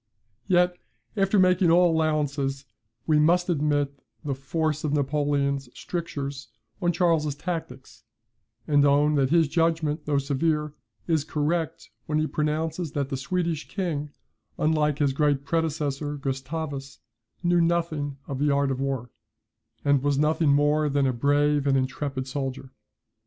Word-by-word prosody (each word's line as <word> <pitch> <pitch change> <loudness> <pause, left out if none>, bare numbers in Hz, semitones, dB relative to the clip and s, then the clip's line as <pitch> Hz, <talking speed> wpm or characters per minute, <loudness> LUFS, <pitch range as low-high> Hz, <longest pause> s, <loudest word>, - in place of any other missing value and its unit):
Yet, 180 -1 +3 0.4
after 195 0 +2
making 185 -2 +4
all 170 0 +5
allowances, 145 -3 0 0.4
we 155 -1 +3
must 175 +4 +3
admit 145 -3 0 0.3
the 140 - -1
force 155 +3 -2
of 150 -2 -1
Napoleon's 140 -2 0
strictures 140 -6 -5 0.3
on 175 - +2
Charles's 165 -5 +1
tactics, 140 -9 -6 0.6
and 145 -2 +4
own 145 +1 +4
that 135 -3 +2
his 165 0 +4
judgment, 165 -1 0
though 145 -1 +2
severe, 150 +2 0 0.3
is 160 -4 +1
correct, 155 +2 -2 0.2
when 150 - 0
he 155 - +2
pronounces 155 +1 -2
that 140 -3 -2
the 135 - -2
Swedish 165 +3 -2
king, 160 -7 -3 0.5
unlike 150 -2 +1
his 140 -3 +1
great 145 -1 +1
predecessor 150 -2 -1
Gustavus, 140 +1 -4 0.5
knew 175 0 +3
nothing 165 -4 0
of 135 -2 -5
the 145 +1 +2
art 140 -1 +2
of 130 - -2
war, 135 -4 -3 0.7
and 140 -2 +3
was 145 0 +1
nothing 155 +1 +2
more 145 +1 +3
than 140 0 +1
a 130 - +1
brave 145 +3 +2
and 135 -1 +3
intrepid 130 0 -2
soldier. 135 -1 -4
150 Hz, 140 wpm, -26 LUFS, 140-160 Hz, 0.7 s, all